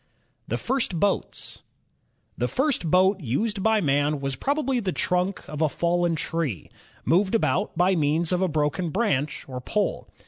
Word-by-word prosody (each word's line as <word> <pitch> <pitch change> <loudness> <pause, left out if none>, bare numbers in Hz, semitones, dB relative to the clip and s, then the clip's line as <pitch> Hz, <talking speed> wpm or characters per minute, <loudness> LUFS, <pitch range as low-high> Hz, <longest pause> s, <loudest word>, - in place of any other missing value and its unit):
The - - -1
First 235 -9 -1
Boats 200 +2 -1 0.7
The 125 - -1
first 265 - 0
boat 190 +3 +4
used 195 - -1
by 220 +1 +3
man 145 -1 +1
was 135 -1 -2
probably 270 - 0
the 195 -5 -1
trunk 180 +2 -1
of 150 +1 -5
a 155 - +3
fallen 170 +2 +1
tree, 155 - -3 0.3
moved 190 +5 +3
about 165 -1 0
by 185 +2 +3
means 160 +2 +1
of 180 0 +1
a 190 - +3
broken 155 +2 0
branch 155 - -1
or 130 -1 -6
pole. 210 +10 -1
175 Hz, 160 wpm, -25 LUFS, 150-200 Hz, 0.7 s, boat